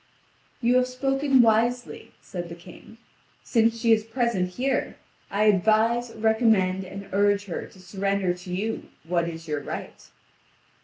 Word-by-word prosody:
"You 245 +1 +4
have 255 0 +2
spoken 270 +1 +2
wisely," 235 +2 0
said 175 -2 -6
the 170 - -7
King; 180 +6 -14 0.5
"since 230 -1 +2
she 230 0 +2
is 220 -1 +4
present 225 -5 -1
here, 260 +1 -1 0.3
I 205 +2 0
advise, 220 +4 +3
recommend, 220 -4 +2
and 195 +2 -9
urge 205 +1 +2
her 180 - -5
to 190 - -18
surrender 195 0 -1
to 180 0 -10
you 210 +5 -3
what 170 +1 0
is 165 0 -9
your 150 -1 -2
right." - - -8
215 Hz, 145 wpm, -25 LUFS, 185-235 Hz, 0.5 s, You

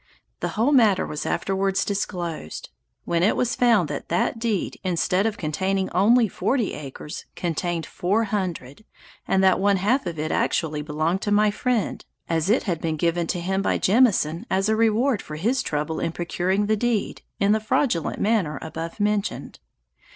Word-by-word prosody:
The - - -1
whole 235 +6 +3
matter 220 -9 +4
was 150 - -5
afterwards 195 0 0
disclosed; 175 - -4 0.4
when 170 -1 0
it 195 - +3
was 245 -1 0
found 230 -9 +3
that 145 - -5
that 175 +6 0
deed 225 -5 -2
instead 185 +2 +1
of 215 - -3
containing 190 +5 -1
only 225 +6 +4
forty 230 +3 -1
acres, 150 +1 -8
contained 175 0 -2
four 205 +6 0
hundred, 185 - -4 0.4
and 190 0 +2
that 190 -1 +4
one 200 0 +3
half 210 +5 +1
of 170 -2 -4
it 155 +1 -2
actually 155 -2 0
belonged 155 +5 -1
to 205 - -2
my 210 0 +4
friend, 235 -1 -1 0.2
as 165 +2 0
it 225 - +3
had 175 -6 -2
been 160 -1 -1
given 170 +1 0
to 175 - -2
him 190 +3 -1
by - - +1
Jemison 200 -4 +2
as 195 +1 +1
a 220 - +3
reward 225 +2 +2
for 155 - -8
his 230 +12 0
trouble 150 +2 -2
in 165 - -2
procuring 180 +4 -1
the 215 +1 +2
deed, 225 -1 -1 0.2
in 200 +1 +3
the 215 - +3
fraudulent 215 - 0
manner 200 -9 +1
above 165 +4 -6
mentioned. 210 0 -1
190 Hz, 175 wpm, -24 LUFS, 165-215 Hz, 0.4 s, matter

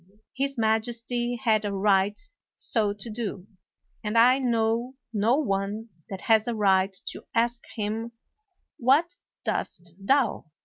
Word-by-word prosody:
His 275 0 -1
majesty 230 +2 0
had 220 -2 +2
a 205 - -2
right 200 0 +2 0.4
so 215 -4 +1
to 205 +2 -7
do; 210 -5 -4 0.6
and 215 +1 -1
I 250 +3 +6
know 235 0 0 0.2
no 220 +4 +3
one 210 -4 -1 0.2
that 190 -2 -6
has 225 -2 +3
a 240 - -1
right 195 -2 +3 0.2
to - - -8
ask 235 +1 +1
him, 220 +2 -3 0.7
"What 290 - +3 0.3
doest 175 -2 -3
thou?" 250 +3 +2
225 Hz, 130 wpm, -26 LUFS, 205-240 Hz, 0.7 s, I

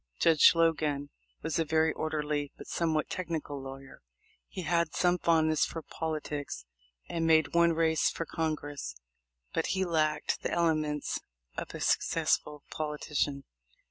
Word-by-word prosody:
Judge 160 -3 +7
Logan 150 -4 +1 0.3
was 160 +1 -1
a - - +3
very 160 0 +2
orderly 150 -2 -2
but - - -10
somewhat 160 -2 0
technical 160 -6 -4
lawyer. 135 0 -10 0.5
He 185 - -6
had 170 0 +1
some 180 0 +3
fondness 160 -2 +3
for 165 - -3
poli 160 -1 -3
tics, 145 - -5 0.4
and 165 -1 -1
made 160 -2 +4
one 170 0 +5
race 160 -1 +2
for 165 - -4
Congress, 145 - -3 0.6
but - - 0
he 190 - +2
lacked 155 -3 0
the - - -2
elements 155 -3 0 0.4
of - - -5
a - - -5
successful 150 -1 +1
politician. 150 -2 -2
155 Hz, 140 wpm, -30 LUFS, 150-165 Hz, 0.6 s, Judge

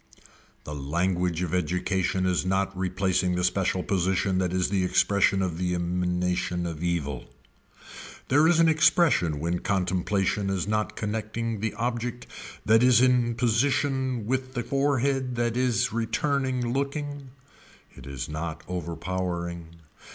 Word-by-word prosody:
The 75 - -7
language 85 +4 -1
of 90 -1 -3
education 90 +1 0
is 90 -1 +1
not 95 +1 0
replacing 95 -1 0
the 90 - -1
special 90 0 +1
position 95 -1 0
that 90 -2 0
is 90 0 0
the 95 -1 +1
expression 95 +1 +2
of 85 -3 -3
the 90 -1 0
emanation 90 +1 -1
of 85 -2 -5
evil. 75 -7 -2 1.0
There 150 +4 +4
is 170 -1 +4
an 165 - +5
expression 155 - +3
when 85 +3 -1
contemplation 95 +1 0
is 95 -2 -1
not 110 0 -1
connecting 110 +1 -3
the 110 0 -2
object 120 +1 -3 0.4
that 110 +2 +5
is 125 -2 +6
in 125 -2 +3
position 130 +1 +1
with 130 +2 -2
the 120 - -1
forehead 135 -2 0
that 120 -1 0
is 125 -4 +1
returning 125 +1 -1
looking. 140 0 -3 0.7
It 65 0 -12
is 70 -2 -5
not 80 +1 -5
overpowering. 85 0 -4
95 Hz, 135 wpm, -26 LUFS, 90-120 Hz, 1.0 s, is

